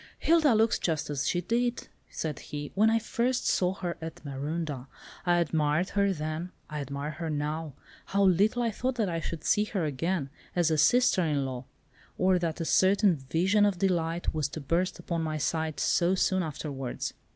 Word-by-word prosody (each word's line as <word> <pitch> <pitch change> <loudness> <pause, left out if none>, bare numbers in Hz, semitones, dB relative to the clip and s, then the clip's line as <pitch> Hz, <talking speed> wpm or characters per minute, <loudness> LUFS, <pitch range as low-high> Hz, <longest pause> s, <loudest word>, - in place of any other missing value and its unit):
"Hilda 315 -7 +4
looks 220 +1 +3
just 160 -3 -1
as 140 -1 -1
she 175 - +1
did," 240 +5 -1 0.2
said 155 -3 -4
he, 145 0 -6
"when 215 +3 +4
I 225 - +3
first 245 +2 -1
saw 185 0 +2
her 175 -3 -4
at 160 -1 -8
Marondah. 145 -1 -4 0.4
I 175 0 +4
admired 160 +1 +1
her 200 -1 +2
then. 155 +1 -4 0.2
I 150 - -3
admire 140 +2 -4
her 160 +2 -5
now—how 155 +5 -3
little 200 +6 +3
I 230 - +1
thought 255 +4 -2
that 220 -6 0
I 165 -1 -1
should 165 -1 -5
see 210 - +3
her 195 -6 -2
again, 150 +1 -2 0.2
as 170 -2 +2
a 155 - +2
sister 245 +3 +4
in 150 -5 0
law! 130 -1 -5 0.5
or 185 0 +3
that 170 -2 -2
a 165 - -2
certain 190 +2 +4
'vision 170 +9 +1
of 200 -3 +2
delight 175 -2 0
was 155 -3 0
to 160 - -6
burst 170 +6 0
upon 170 -1 -3
my 155 -1 -2
sight' 160 0 -1
so 180 +2 +2
soon 185 0 +2
afterwards." 140 -5 -4
170 Hz, 185 wpm, -29 LUFS, 150-195 Hz, 0.5 s, Hilda